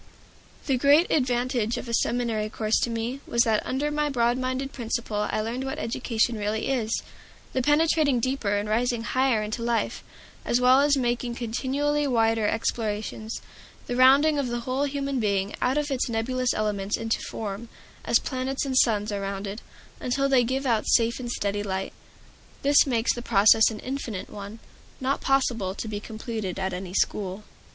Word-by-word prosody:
The 265 -3 +1
great 290 +6 +5
advantage 245 -4 +1
of - - -6
a 235 - -4
seminary 230 -2 0
course 215 0 0
to - - 0
me 230 +3 -3
was 235 0 +3
that 220 -4 +1
under 285 +3 -1
my 300 0 0
broad 240 -3 +2
minded 260 +1 -3
Principal 225 -3 -2
I - - 0
learned 235 +4 -3
what 265 0 -4
education 230 0 -1
really 210 +3 -1
is: 235 -4 -1 0.5
the 260 - +1
penetrating 295 -1 +3
deeper 235 -5 0
and 205 +1 -2
rising 235 +2 0
higher 255 -3 +1
into 215 +2 -4
life, 235 0 -1 0.4
as 240 - +1
well 250 +1 +6
as 285 0 +4
making 240 -1 -1
continually 280 +5 -1
wider 225 -3 +2
explorations; 220 0 -2 0.4
the 245 - -3
rounding 280 +4 +5
of 275 - -1
the 240 0 -3
whole 260 +4 -1
human 275 -1 -2
being 200 -2 0
out 260 +3 +1
of 295 -1 -1
its 260 -2 0
nebulous 250 +2 0
elements 205 -1 -1
into 225 0 -1
form, 215 +1 -6 0.3
as - - +4
planets 260 +1 -3
and 265 -1 +2
suns 210 -2 +2
are 200 -1 -3
rounded, 195 +2 -4 0.4
until 275 +2 0
they 265 -3 +4
give 265 +3 -2
out 230 -4 +1
safe 230 0 +3
and 240 -2 -4
steady 205 -2 -1
light. 190 -1 -3 0.7
This 285 +1 +5
makes 235 -3 +1
the 240 - -6
process 220 -1 +5
an 220 - -6
infinite 250 -7 -5
one, 205 +1 -8 0.4
not 265 +2 -1
possible 240 -8 +1
to 220 - -5
be 210 -1 -4
completed 220 -3 -5
at 190 -1 -2
any 180 0 -6
school. 200 0 -1
235 Hz, 175 wpm, -26 LUFS, 215-265 Hz, 0.7 s, well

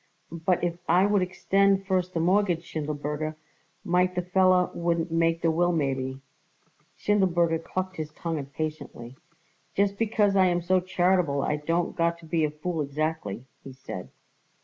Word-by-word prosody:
"But 170 +2 0
if 175 0 -1
I 180 +3 +5
would 205 -1 +2
extend 195 +2 +2
first 185 -2 -1
the - - +1
mortgage, 180 0 +2
Schindelberger, 150 0 -3 0.5
might 180 +1 +2
the 180 - -1
feller 185 0 +3
wouldn't 170 -1 -1
make 165 0 +1
the 165 - +3
will 175 +2 +2
maybe." 135 -4 -2 0.8
Schindelberger 175 -5 +2
clucked 185 +1 -4
his 155 -1 -4
tongue 165 0 -3
impatiently. 140 -4 -6 0.6
"Just 200 0 +1
because 210 -3 +2
I 190 -1 +5
am 175 -1 0
so 185 +2 +3
charitable 180 -5 +1
I 150 - 0
don't 165 +3 -1
got 170 0 +1
to 170 - -15
be 160 0 0
a 155 - +2
fool 155 +2 -3
exactly," 145 -6 -3 0.2
he 135 - -9
said. 130 -8 -8
170 Hz, 155 wpm, -27 LUFS, 155-185 Hz, 0.8 s, I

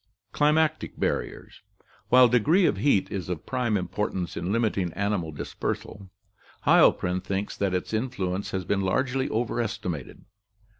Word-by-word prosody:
Climatic 155 +1 +1
Barriers. - - -3 0.2
— - - -33
While 125 0 +7
degree 145 - +3
of - - +2
heat 140 -9 +2
is 95 -3 -4
of 90 -4 -4
prime 120 -5 0
importance 90 -1 -3
in 85 +3 -3
limiting 105 -6 0
animal 100 -5 -1
dispersal, 95 +5 -5 0.6
Heilprin 90 +1 +4
thinks 100 +2 -3
that 95 -2 0
its 90 - -3
influence 100 -5 -2
has 95 -2 -3
been 100 +1 0
largely 130 +7 0
overestimated. 110 - -3
100 Hz, 135 wpm, -26 LUFS, 90-125 Hz, 0.6 s, While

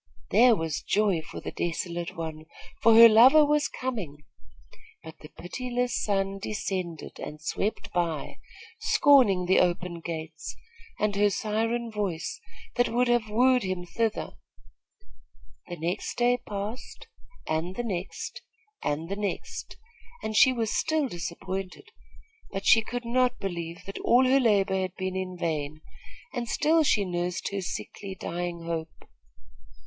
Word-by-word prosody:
There 245 -1 +6
was 160 -4 -3
joy 200 -5 +1
for 160 - -9
the - - -5
desolate 175 +1 -3
one, 160 -1 -6 0.3
for 225 -1 +6
her 230 +1 +11
lover 255 +7 +7
was 295 0 +2
coming; 195 - -5 0.8
but 160 -1 -11
the 150 - -12
pitiless 245 +7 -3
sun 195 -1 0
descended 190 -5 -4
and 150 +1 -7
swept 195 +7 -3
by, 170 -4 -2 0.4
scorning 245 -11 +4
the 185 - +4
open 175 -1 0
gates, 160 -1 -6 0.4
and 210 -1 +1
her 205 +1 +4
siren 225 +3 -1
voice, 195 -6 -3 0.4
that 245 - +3
would 245 +1 +1
have 240 -2 +2
wooed 250 +3 +4
him 185 -3 -3
thither. 220 +6 -2 1.4
The 175 - -6
next 170 +5 -3
day 245 +1 +3
passed, 210 +4 -6 0.4
and 165 +4 -2
the 240 - -2
next, 190 -5 -5 0.4
and 155 +3 -2
the 200 - -3
next, 205 -1 -5 0.5
and 220 - -3
she 260 - +7
was 230 -3 -1
still 315 -3 +1
disappointed; 185 - -5 0.6
but 195 0 -5
she 225 - +7
could 245 +2 -5
not 250 +1 +2
believe 170 -3 -5
that 195 - -6
all 250 +2 +4
her 265 +2 +4
labor 195 -5 +2
had 185 -1 -4
been 185 0 -3
in 185 -1 -4
vain, 155 -3 -2 0.5
and 240 -3 -3
still 320 +2 +3
she 215 -9 +2
nursed 175 0 -2
her 200 -1 -2
sickly, 190 +2 -6
dying 175 -1 -4
hope. 165 -1 -5
195 Hz, 140 wpm, -27 LUFS, 170-235 Hz, 1.4 s, her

